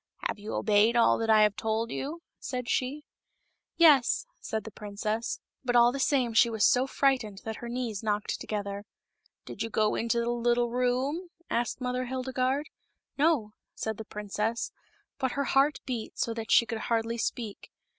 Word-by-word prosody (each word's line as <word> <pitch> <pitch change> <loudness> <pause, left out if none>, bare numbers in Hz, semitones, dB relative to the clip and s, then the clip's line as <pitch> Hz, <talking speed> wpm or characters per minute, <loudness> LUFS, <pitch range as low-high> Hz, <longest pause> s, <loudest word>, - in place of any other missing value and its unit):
" - - -3
Have - - -5
you 210 +1 -5
obeyed 215 +2 +3
all 235 - +4
that 225 0 -1
I 215 -1 +7
have 210 -1 +3
told 225 +1 -1
you 325 +5 -4
?" - - -59
said 250 -2 -4
she, 280 +4 -1 0.3
" - - -47 0.3
Yes," 325 - +5
said 220 -1 -3
the 220 - -8
princess, 210 +2 -3 0.2
but 245 -2 0
all 240 0 +7
the 275 - -4
same 260 -4 +2
she 235 +1 +5
was 220 -3 +2
so 255 +2 +4
frightened 250 -8 0
that 220 -1 -4
her 240 - -7
knees 235 -4 -3
knocked 210 -2 -1
together. 200 -1 -4 0.3
" - - -41
Did - - -8
you 225 - -1
go 215 -1 +2
into 235 +1 0
the 235 0 0
little 240 0 +1
room 255 +8 0
?" 340 - -34
said 240 +2 0
Mother 250 0 -2
Hildegarde. 260 +3 -1 0.3
" - - -55
No," 280 -9 +2 0.2
said 220 -1 -3
the 220 - -6
princess; 210 +2 -3 0.5
but 260 -2 0
her 280 - 0
heart 275 +2 +2
beat 240 -4 -4
so 230 - 0
that 225 -1 -6
she 235 - +6
could 225 0 -4
hardly 230 0 0
speak. 225 -3 -4
235 Hz, 195 wpm, -29 LUFS, 220-255 Hz, 0.5 s, I